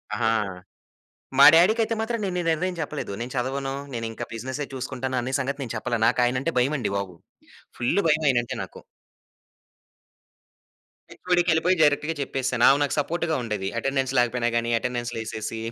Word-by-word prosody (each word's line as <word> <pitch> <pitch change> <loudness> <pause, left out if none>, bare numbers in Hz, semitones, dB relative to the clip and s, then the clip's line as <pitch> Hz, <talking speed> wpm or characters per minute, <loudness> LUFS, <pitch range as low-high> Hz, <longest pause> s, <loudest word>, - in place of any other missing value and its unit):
ఆహా! 110 - +1 1.1
మా - - +10
డాడీకైతే 220 +7 +4
మాత్రం 230 +1 -2
నేను 185 -2 -2
ఈ - - -4
నిర్ణయం 180 +3 0
చెప్పలేదు. 150 -7 -4
నేను 125 - -5
చదవను, 135 +2 -2 0.2
నేను 115 -1 -3
ఇంకా 115 - -6
బిజినెస్సే 130 +5 -4
చూసుకుంటాను 130 0 -3
అన్న 125 +2 -3
సంగతి 140 +2 -3
నేను 120 - -6
చెప్పలే. 120 +2 -2
నాకు 125 - +2
ఆయనంటే 130 +6 -1
భయం 135 +5 +1
అండి 120 - -2
బాబు. 95 -3 -5 0.6
ఫుల్ 120 +11 +1
భయం 155 0 +2
ఆయన 125 - +3
అంటే - - -5
నాకు. - - -10 2.3
హెచ్ఓడికి 180 -1 0
యెళ్ళిపోయి 165 +3 +3
డైరెక్ట్‌గా 150 +1 +3
చెప్పేసాను. 130 -3 -1
ఆమె 140 - +5
నాకు 145 - -1
సపోర్ట్‌గా 160 +2 -1
ఉండేది. 105 -4 -3
అటెండెన్స్ 135 0 -1
లేకపోయినా 120 0 +1
గాని 115 0 -1
అటెండెన్స్ 120 0 -3
లేసేసి, 110 0 -5
130 Hz, 155 wpm, -25 LUFS, 120-160 Hz, 2.3 s, మా